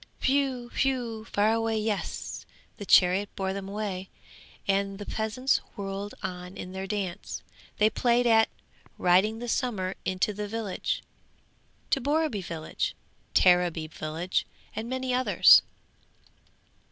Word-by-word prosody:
'Whew! 265 -3 +1
whew! 240 -5 -1
fare 215 0 +2
away! 225 -1 0
Yes, 210 -2 -3 0.3
the 205 - -8
chariot 185 +3 +5
bore 190 -1 -1
them 195 0 -5
away, 200 -2 -4 0.6
and 195 0 +1
the 205 - -7
peasants 220 +6 0 0.2
whirled 200 0 -5
on 180 0 -5
in 180 - -6
their 190 +1 -5
dance. 195 -4 -4 0.3
They 210 - +5
played 240 +2 +2
at 225 -1 +5 0.5
"Riding 190 +5 +3
the 240 +1 -6
Summer 210 -7 -1
into 185 +3 0
the 210 +1 -4
village," 215 -2 -3 0.9
to 275 - +3
Borreby 290 -5 +1
village, 165 -3 -3 0.4
Tareby 175 -3 +4
village, 160 +5 -2 0.3
and 225 +2 -4
many 260 0 -1
others. 255 +1 +7
205 Hz, 125 wpm, -28 LUFS, 190-235 Hz, 0.9 s, others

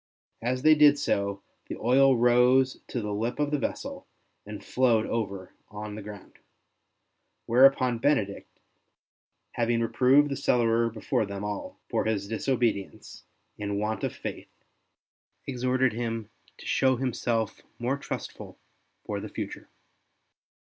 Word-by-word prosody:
As 125 +3 -2
they 155 0 +7
did 150 -1 +6
so, 100 -6 -1 0.2
the - - -5
oil 130 +2 +4
rose 125 +2 +4
to 120 - -3
the 105 -1 -3
lip 115 +4 -2
of 145 -1 0
the 150 - +1
vessel - - -5 0.4
and 105 -1 -8
flowed 120 -4 +2
over 100 -5 -4 0.2
on 105 0 -7
the 105 - -7
ground; 105 -1 -11 1.1
whereupon 125 -1 +4
Benedict, 110 -8 -1 0.9
having 115 0 0
reproved 130 +5 +4
the - - -1
cellarer 115 -3 +2
before 115 0 -1
them 100 0 -6
all 105 -1 -5
for - - -1
his 105 -3 -1
disobedience 115 -2 -2 0.3
and 100 -1 -2
want 105 +1 -2
of - - -2
faith, - - -7 1.0
exhorted 130 -1 0
him 115 -1 -4 0.3
to - - -13
show 130 -1 +2
himself 115 -3 -2 0.2
more 125 +3 -1
trustful - - -7 0.5
for - - -3
the - - -7
future. - - -7
115 Hz, 130 wpm, -27 LUFS, 105-130 Hz, 1.1 s, they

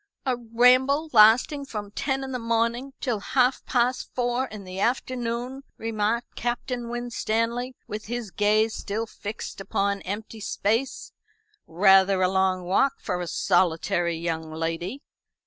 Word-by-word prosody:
"A 260 -2 +1
ramble 250 +6 +3
lasting 235 +6 +6
from 210 -6 -6
ten 270 +4 -2
in 265 - -5
the 250 - -2
morning 230 +3 0
till 240 -6 -1
half 255 +4 +1
past 250 0 +1
four 245 +1 0
in 215 -4 -9
the 185 0 -7
afternoon," 245 +2 -2 0.2
remarked 225 +1 -1
Captain 240 0 -3
Winstanley, 240 +1 -2
with 210 0 -6
his 235 -2 -4
gaze 215 +2 +2
still 215 +2 -3
fixed 210 -2 -7
upon 200 +1 -1
empty 215 +3 -6
space. 220 +5 -1 0.6
"Rather 190 +2 +5
a 185 - +3
long 190 -1 +1
walk 195 +10 +2
for 180 -1 -3
a 175 - -4
solitary 170 -1 +1
young 160 -1 -3
lady." 165 - -3
225 Hz, 135 wpm, -25 LUFS, 195-245 Hz, 0.6 s, lasting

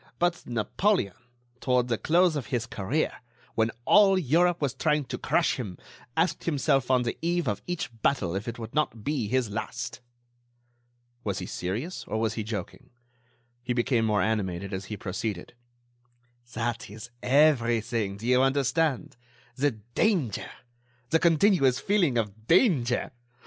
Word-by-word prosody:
But 175 0 0
Napoleon, 120 - 0 0.5
toward 125 -1 +1
the 115 -3 -1
close 175 0 +3
of 135 -7 -3
his 120 -1 -1
career, 110 +11 -2 0.3
when 110 0 +2 0.2
all 200 -2 +6
Europe 175 +2 +2
was 140 -5 -1
trying 150 -3 +1
to - - -5
crush - - +1
him, 100 -8 -5 0.4
asked 165 +3 +1
himself 135 -4 +1
on 130 -1 +3
the 120 - -3
eve 170 -2 0
of 105 - -1
each 175 -8 -3
battle 95 -11 +1
if 100 +4 -4
it 115 - -4
would 115 -1 -8
not 140 -8 -1
be 140 -5 -1
his 125 -1 0
last." 125 +4 -5 1.2
Was 100 -3 -2
he - - -4
serious? 110 - -4
Or 110 - -2
was 110 -1 0
he 115 - -3
joking? 105 -4 -6 0.7
He 125 0 -2
became 120 -1 +1
more 105 -2 +2
animated 100 -4 -2
as 95 +1 -4
he 105 - -6
proceeded: 100 0 -4 1.0
"That 120 +1 -3
is 110 +3 -10
everything, 120 -7 +2
do 110 - -9
you 125 +1 +4
understand, 140 +1 +1 0.4
the 145 +3 +2 0.2
danger! 175 - +1 0.6
The 165 - +4
continuous 165 -6 +4
feeling 180 - +2
of 110 0 -3
danger! 160 - +3
125 Hz, 150 wpm, -27 LUFS, 110-155 Hz, 1.2 s, all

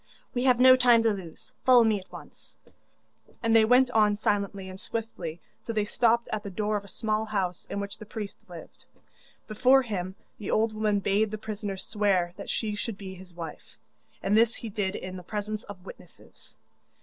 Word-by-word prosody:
'We 250 0 0
have 250 -2 +4
no 255 0 +9
time 245 -3 +5
to 225 -2 +3
lose 180 -5 -10
follow 250 -2 +7
me 220 -2 +2
at 185 - -17
once,' - - -13 0.9
and 230 0 +3
they 225 - +7
went 250 +3 +5
on 210 -3 +4
silently 200 -2 -1
and 185 0 -9
swiftly 185 -9 -5 0.2
till 230 - -5
they 210 -1 +1
stopped 235 +2 +2
at 215 - -1
the 205 - -7
door 210 +2 -1
of 205 - -2
a - - -13
small 215 +2 -1
house 190 -5 -2
in 200 - -3
which 200 0 -5
the 215 - -9
priest 210 -2 -6
lived. - - -12 0.6
Before 255 +5 +4
him 190 -5 -4 0.2
the 205 - -6
old 220 0 +2
woman 210 -2 +1
bade 205 +3 +2
the 215 - -4
prisoner 210 -2 -5
swear 190 -3 0
that - - -8
she 215 -2 -1
should 210 0 -4
be 190 -2 -8
his 180 -1 -13
wife, 165 -3 -9 0.5
and 200 +2 +2
this 230 +1 +4
he 230 - -7
did 200 -1 -2
in 185 0 -6
the - - -8
presence 210 +2 -4
of 195 -2 -11
witnesses. - - -14
210 Hz, 195 wpm, -27 LUFS, 195-225 Hz, 0.9 s, no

